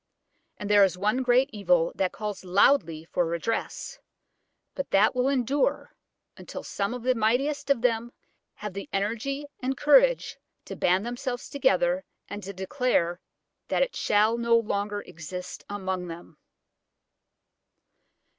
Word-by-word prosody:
And 205 - -5
there 205 -1 +6
is 185 -2 +2
one 210 +7 +1
great 255 +1 +4
evil 180 -5 +2
that 190 -1 0
calls 210 -2 -5
loudly 180 - +3
for 175 - 0
redress, 170 +7 -3 0.7
but 275 - -4
that 205 +5 +4
will 250 0 +1
endure 275 +1 0 0.4
until - - -8
some 200 +4 -2
of 245 - -7
the 255 +1 +3
mightiest 270 +6 0
of 275 -4 +2
them 235 -1 +1 0.4
have 210 -2 -6
the 200 +1 -7
energy 230 +8 -2
and 265 +1 -2
courage - - +4 0.3
to - - -7
band 185 +4 +2
themselves 245 +1 -4
together 185 -8 +2 0.2
and 205 - -6
to 200 - -6
declare 190 -4 0 0.5
that - - +2
it - - -4
shall 215 +3 +2
no 235 0 +4
longer 205 -2 -2
exist 180 +3 -8
among 190 -3 -3
them. 165 -2 -10
210 Hz, 135 wpm, -27 LUFS, 190-250 Hz, 0.7 s, there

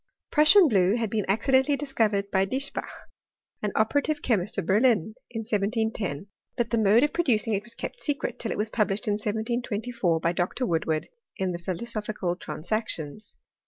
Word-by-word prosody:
Prussian 325 +5 +7
blue 195 -4 +3
had 225 -4 -2
been 215 -3 0
accidentally 265 +7 +3
dii^ 275 0 -6
covered 200 -4 +1
by 190 0 +3
Diesbach, 265 +8 -2 0.7
an 210 - -1
operative 285 +7 +1
chemist 210 -4 0
of 195 - -1
berlin, 215 0 +3 0.2
in 225 -2 -4
1710, 210 - -1 0.3
but 235 -1 0
the 230 - +2
mode 220 +4 +5
of 295 - +1
producing 230 -10 +1
it 200 - 0
was 230 +2 -7
kept - - -6
secret 290 -2 -3
till 225 - -3
it - - -3
was 215 +1 -1
published 210 -2 0
in - - +2
1724, 220 -3 -1
by 165 +1 +1
Dr. 175 +8 -1
Woodward 160 -4 -1 0.3
in. 190 -1 -1
the 170 - -4
Philosophical 200 0 -3
Transactions. 180 -1 -4
215 Hz, 165 wpm, -26 LUFS, 195-240 Hz, 0.7 s, Prussian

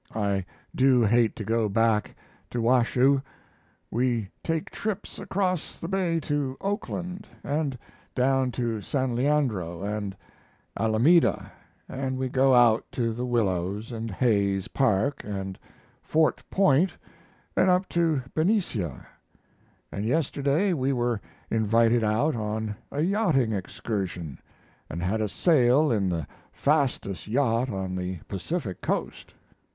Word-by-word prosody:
I 100 -3 0 0.3
do 130 -2 +4
hate 115 +1 +3
to 110 - -5
go 110 0 +1
back 110 0 +1 0.3
to 120 - -3
Washoe. 125 +3 +3 0.7
We 120 -4 0
take 165 +3 -2
trips 210 -1 -4
across 185 -4 -2
the 165 - -6
bay 180 -3 0
to 145 -3 -2
Oakland, 195 -2 -4 0.2
and 145 -2 -1 0.4
down 130 0 +2
to 115 -3 -2
San 130 +2 -1
Leandro 120 - 0
and 100 -1 -3 0.6
Alameda, 115 +11 +3 0.4
and 130 -1 -3
we 130 0 -2
go 130 +1 +4
out 120 -2 +5
to 115 -2 0
the 125 +2 -3
Willows 105 -1 -1
and 115 -1 -4
Hayes 100 -3 +1
Park 135 +2 +1
and 95 -2 -5 0.4
Fort 160 0 +1
Point, 185 -2 +3 0.6
and 185 - +4
up 180 +1 +3
to 165 -6 +1
Benicia; 155 - 0 0.9
and 100 - -4
yesterday 145 - +1
we 135 -3 0
were 120 -4 0 0.3
invited 115 +1 +3
out 115 +8 +1
on 110 -1 -3 0.2
a 145 - -1
yachting 170 - +2
excursion, 95 - -4 0.5
and 85 +3 -4
had 105 +4 0
a 105 - 0
sail 145 - +4
in 100 -5 +1
the 85 -4 -2 0.3
fastest 140 -10 0
yacht 120 +1 +1
on 95 -3 -3
the 90 0 -3
Pacific 100 - -4
coast. - - -3
120 Hz, 125 wpm, -26 LUFS, 105-145 Hz, 0.9 s, out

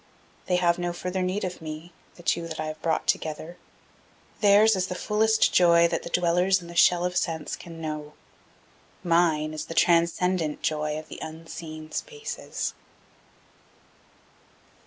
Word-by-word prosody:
They 180 - +2
have 175 -1 +2
no 175 0 -2
further 180 +2 -3
need 185 +3 -1
of 180 -2 -4
me, 160 +2 -8 0.2
the 175 - -14
two 170 0 0
that 160 -1 -7
I 155 - -2
have 155 0 -6
brought 165 - 0
together. 160 +2 -2 0.8
Theirs 210 +1 +6
is 185 0 0
the 180 - -4
fullest 220 +3 +2
joy 170 -1 +6
that - - -1
the - - -7
dwellers 180 +2 +2
in 175 - -12
the 170 - -10
shell 175 +1 +5
of 180 0 -2
sense 165 -3 -1
can 165 -2 -11
know. 150 -2 -5 0.9
Mine 165 -3 +2
is 155 - -5
the 165 - -7
transcendent 170 -1 +2
joy 150 -1 -1
of 155 - -8
the - - -9
unseen 155 -1 -8
spaces. 450 -3 -4
170 Hz, 155 wpm, -26 LUFS, 155-180 Hz, 0.9 s, Theirs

